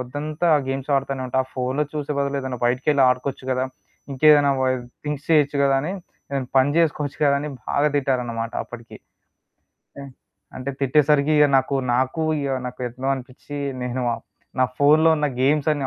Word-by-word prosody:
పొద్దంతా 150 +6 -3
ఆ - - +2
గేమ్స్ 135 +1 -3
ఆడతానే 135 -1 -2
ఉంటావు, 130 +1 0
ఆ - - -26
ఫోనులో 130 +4 0
చూసే 150 -1 -3
బదులే 140 0 -1
ఏదైనా 130 -2 -4
బయటికెళ్ళి 135 +3 +2
ఆడుకోవచ్చు 130 +1 -2
కదా! 130 0 0 0.5
ఇంకేదైనా 145 +1 +5
బా 130 - +2 0.4
థింక్స్ 150 -1 -4
చేయొచ్చు 145 -3 +3
కదా! 135 -1 +3
అని, 170 +6 -3 0.4
ఏదైనా 135 -2 -2
పని 130 +2 +3
చేేసుకోవచ్చు 150 -3 0
కదా!" 140 -1 +4
అని 150 - -4 0.2
బాగా 145 +1 +2
తిట్టారన్నమాట 120 -4 -1
అప్పటికి. 120 -1 -11 1.0
హ్మ్. 140 -1 -8 0.5
అంటే 130 +2 -4
తిట్టేసరికి 145 +2 +3
ఇక 150 - +7
నాకు, 135 +1 -1 0.2
నాకు 130 +5 0 0.2
ఇగ 140 - -2 0.2
నాకెట్లో 125 +1 -5
అనిపించీ, 130 +3 -9 0.3
నేను 125 +1 -3
ఆహ్, - - -10 0.4
నా 130 - +5
ఫోనులో 155 +3 +5
ఉన్న 150 - +1 0.2
గేమ్స్ 150 +2 +2
అన్ని 145 -3 -2
140 Hz, 165 wpm, -22 LUFS, 130-150 Hz, 1.0 s, ఇక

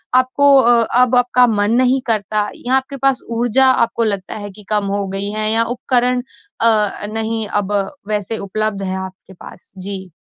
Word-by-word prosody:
आपको 260 +2 +3
अ, 240 -3 +4 0.2
अब 250 0 +2
आपका 245 0 +4
मन 205 -2 0
नहीं 255 +1 +2
करता 210 -1 0
या 255 +2 -1
आपके 265 +1 -2
पास 270 0 +1 0.2
ऊर्जा 245 +3 +2 0.2
आपको 230 0 -3
लगता 200 -4 -3
है 205 - -7
कि 210 +2 -13
कम 210 -1 +1
हो 200 -1 -2
गई 195 +1 -2
है 215 0 -1
या 225 +1 +4
उपकरण 250 0 0 0.4
अ, 215 -3 +2
नहीं 225 0 -1 0.2
अब 200 0 -7 0.4
वैसे 210 +1 -2
उपलब्ध 205 0 -3
है 190 0 -3
आपके 190 0 -14
पास? 175 - -12
जी। 190 0 -6
220 Hz, 175 wpm, -17 LUFS, 205-245 Hz, 0.4 s, अ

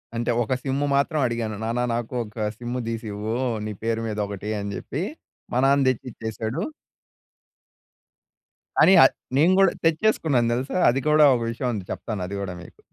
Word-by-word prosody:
అంటే, 120 +1 0
ఒక 120 - -1
సిమ్ము 140 +1 0
మాత్రం 150 +3 +1
అడిగాను, 115 -2 -3
"నాన్న 115 +2 -1
నాకు 120 +1 -3
ఒక 105 0 -6
సిమ్ము 120 +1 -4
దీసివ్వూ, 110 -1 -4 0.3
నీ 110 - -3
పేరు 115 0 0
మీదొకటి." 105 -1 -4
అని 100 0 -4
జెప్పి. - - -4 0.5
మా - - +1
నాన్న 140 0 +4
తెచ్చిచ్చేసాడు. 115 +1 -4 2.2
కానీ, 190 - +7
ఆ - - +9 0.3
నేను 170 +6 +5
గూడా 195 -2 +5
తెచ్చేసుకున్నాను 160 - +2
దెలుసా! 130 +7 -3
అది 125 +3 +1
కూడా 150 0 +6
ఒక 120 - -2
విషయం 125 +2 -2
ఉంది. 100 -4 -5
చెప్తాను 105 -4 -4
అది 100 - -5
గూడా 95 -2 -4
మీకు. - - -16
120 Hz, 155 wpm, -24 LUFS, 110-135 Hz, 2.2 s, ఆ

